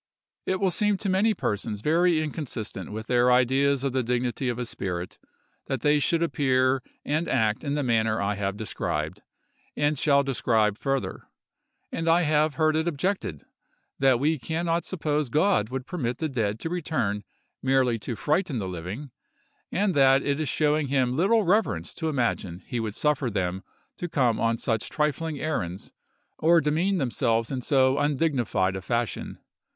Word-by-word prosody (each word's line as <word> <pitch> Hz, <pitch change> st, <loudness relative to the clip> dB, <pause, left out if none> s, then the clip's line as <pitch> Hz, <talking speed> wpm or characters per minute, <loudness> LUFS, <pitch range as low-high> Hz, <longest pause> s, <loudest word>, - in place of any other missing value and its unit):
It 185 Hz, 0 st, 0 dB
will 190 Hz, -1 st, +2 dB
seem 210 Hz, +3 st, +1 dB
to 195 Hz, -, -3 dB
many 205 Hz, +4 st, +3 dB
persons 105 Hz, 0 st, -2 dB
very 165 Hz, +3 st, +3 dB
inconsistent 145 Hz, -11 st, -5 dB
with 110 Hz, +1 st, -5 dB
their 125 Hz, +1 st, +3 dB
ideas 135 Hz, +2 st, +3 dB
of 135 Hz, -, 0 dB
the 130 Hz, +1 st, +1 dB
dignity 125 Hz, +1 st, -1 dB
of 120 Hz, -, -2 dB
a 125 Hz, -, -3 dB
spirit 90 Hz, -5 st, -5 dB, 0.5 s
that 135 Hz, -3 st, -2 dB
they 150 Hz, 0 st, +3 dB
should 165 Hz, +3 st, +1 dB
appear 130 Hz, -4 st, +2 dB, 0.2 s
and 155 Hz, +3 st, 0 dB
act 110 Hz, -3 st, +1 dB
in 145 Hz, -1 st, -1 dB
the 145 Hz, -, 0 dB
manner 110 Hz, -3 st, +1 dB
I 100 Hz, +1 st, 0 dB
have 100 Hz, 0 st, -3 dB
described, 110 Hz, -, -3 dB, 0.6 s
and 145 Hz, -1 st, +1 dB
shall 140 Hz, -2 st, +4 dB
describe 110 Hz, -6 st, +1 dB
further; 135 Hz, -1 st, -2 dB, 0.6 s
and 165 Hz, 0 st, -1 dB
I 170 Hz, +2 st, +4 dB
have 155 Hz, 0 st, +2 dB
heard 155 Hz, -1 st, +2 dB
it 160 Hz, +2 st, 0 dB
objected 170 Hz, -, -2 dB, 0.6 s
that 130 Hz, -3 st, +4 dB
we 155 Hz, +2 st, +1 dB
can 160 Hz, +6 st, -3 dB
not 170 Hz, 0 st, 0 dB
suppose 150 Hz, -6 st, -1 dB
God 155 Hz, -, +2 dB
would 130 Hz, 0 st, -4 dB
permit 125 Hz, -9 st, -3 dB
the 160 Hz, -, -1 dB
dead 110 Hz, -5 st, -1 dB
to 165 Hz, -, -3 dB
return 150 Hz, -, -1 dB, 0.4 s
merely 130 Hz, -3 st, +2 dB
to 115 Hz, +3 st, -4 dB
frighten 150 Hz, -, 0 dB
the 100 Hz, -4 st, -3 dB
living, 90 Hz, -, -6 dB, 0.6 s
and 200 Hz, -1 st, +1 dB
that 135 Hz, -1 st, +5 dB
it 140 Hz, +1 st, 0 dB
is 155 Hz, -, -1 dB
showing 150 Hz, -1 st, +1 dB
him 130 Hz, -2 st, +1 dB
little 205 Hz, +8 st, +3 dB
reverence 180 Hz, -, +1 dB
to 160 Hz, -2 st, -2 dB
imagine 115 Hz, -, -2 dB
he 125 Hz, -3 st, -3 dB
would 110 Hz, -2 st, -3 dB
suffer 150 Hz, -4 st, +1 dB
them 95 Hz, -3 st, -2 dB, 0.4 s
to 175 Hz, -, -4 dB
come 125 Hz, -7 st, +1 dB
on 115 Hz, 0 st, +1 dB
such 115 Hz, -1 st, -2 dB
trifling 150 Hz, 0 st, -1 dB
errands, 95 Hz, -, -3 dB, 0.5 s
or 165 Hz, +2 st, +5 dB
demean 165 Hz, +6 st, +1 dB
themselves 115 Hz, -4 st, 0 dB
in 130 Hz, -2 st, -2 dB
so 130 Hz, +1 st, +3 dB
undignified 135 Hz, -, +1 dB
a 95 Hz, -, -4 dB
fashion. 115 Hz, +1 st, -2 dB
135 Hz, 170 wpm, -26 LUFS, 115-155 Hz, 0.6 s, that